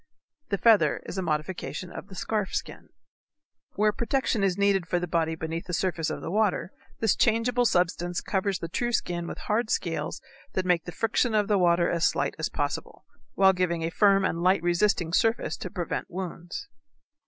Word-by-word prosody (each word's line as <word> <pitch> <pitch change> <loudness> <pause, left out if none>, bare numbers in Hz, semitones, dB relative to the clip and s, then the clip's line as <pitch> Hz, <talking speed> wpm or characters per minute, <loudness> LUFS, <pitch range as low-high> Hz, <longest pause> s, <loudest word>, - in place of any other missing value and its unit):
The 200 - 0
feather 225 0 +4
is 190 - -5
a - - 0
modification 175 +2 -3
of 185 - -8
the 195 - -11
scarf 210 +1 -2
skin. - - -5 0.9
Where 210 +1 +3
protection 235 -2 0
is 190 -1 +1
needed 200 -3 +2
for 175 - +1
the 175 - -1
body 165 -1 0
beneath 160 +1 -5
the 180 - -1
surface 170 -3 -1
of - - -4
the - - -5
water 205 -2 +1 0.3
this 220 -3 +3
changeable 240 +2 +2
substance 175 -2 +1
covers 195 -1 -1
the 165 - -5
true 240 +8 -2
skin 175 -5 -1
with - - -6
hard 215 +1 -1
scales - - -2 0.3
that 185 - -1
make 180 -2 +2
the 175 - -6
friction 225 +3 +1
of 210 -1 +2
the 205 -2 +3
water 170 -1 +3
as 170 -1 +2
slight - - 0
as - - -1
possible, - - -4 0.3
while 190 0 +6
giving 175 -3 0
a 165 - -1
firm 195 +1 +4
and 170 -1 -1
light 185 -1 +3
resisting 175 -1 +1
surface 225 +5 +1
to 185 - -6
prevent 175 -1 -4
wounds. 175 -1 -6
185 Hz, 190 wpm, -27 LUFS, 175-210 Hz, 0.9 s, while